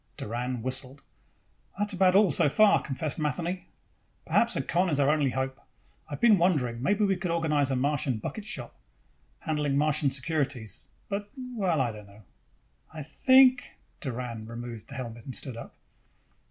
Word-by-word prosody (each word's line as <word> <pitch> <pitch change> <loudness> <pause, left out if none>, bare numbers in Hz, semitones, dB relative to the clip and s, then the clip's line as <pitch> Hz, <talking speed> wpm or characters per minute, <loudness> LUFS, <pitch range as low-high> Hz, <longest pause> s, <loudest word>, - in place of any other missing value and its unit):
Doran 120 +1 -4
whistled. 130 +2 -2 0.7
"That's 205 0 0
about 185 0 +3
all, 200 -4 +5
so 145 - +3
far," 215 +6 +5
confessed 150 +3 -3
Matheny. 170 +5 -2 0.6
"Perhaps 235 - +2
a 135 - -1
con 175 +6 +1
is 145 -3 0
our 140 +1 +4
only 150 -3 +2
hope. 130 +1 -3 0.5
I've 145 - -5
been 220 -5 +6
wondering, 130 -10 +1
maybe 205 +8 +2
we 195 -1 +2
could 180 0 -4
organize 155 -4 +1
a 135 - 0
Martian 135 -2 0
bucket 205 - -6
shop, 120 - -5 0.6
handling 150 -3 0
Martian 150 -1 +2
securities, 135 -5 -3 0.2
but 205 0 -4
well, 220 - -1
I 125 -3 +1
don't 105 -1 -11
know." 100 +2 -17 0.7
"I 155 -1 -7
think 260 - +4
" - - -40
Doran 120 -5 -5
removed 115 -1 -7
the 140 - -9
helmet 120 -3 -7
and 130 - -6
stood 130 -4 -4
up. 115 - -10
145 Hz, 165 wpm, -28 LUFS, 125-180 Hz, 0.7 s, been